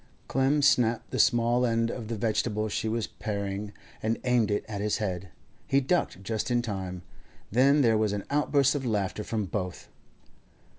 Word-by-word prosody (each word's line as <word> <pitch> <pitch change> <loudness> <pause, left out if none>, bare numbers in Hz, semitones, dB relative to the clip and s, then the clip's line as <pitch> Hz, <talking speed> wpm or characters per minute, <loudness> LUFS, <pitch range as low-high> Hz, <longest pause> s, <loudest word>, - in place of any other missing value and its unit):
Clem 135 +3 +2
snapped 120 -4 +3
the - - -2
small 120 -1 +3
end 115 -1 +1
off 115 -3 -6
the 115 - -3
vegetable 110 0 0
she 110 +2 -2
was 115 0 -1
paring, 100 -1 -4 0.3
and 110 +1 0
aimed 125 -4 +2
it 105 - -1
at 100 -2 -4
his 105 0 0
head. 95 -3 -3 0.4
He 135 - +3
ducked 140 - 0
just 110 +3 -2
in 120 -1 +1
time. 95 -5 -4 0.5
Then 135 +6 +5
there 115 -4 +4
was 110 -2 +1
an 100 -1 -3
outburst 140 -1 +3
of 145 -2 -2
laughter 105 -3 -1
from 110 -2 -2
both. 90 -2 -5
110 Hz, 170 wpm, -28 LUFS, 105-125 Hz, 0.5 s, Then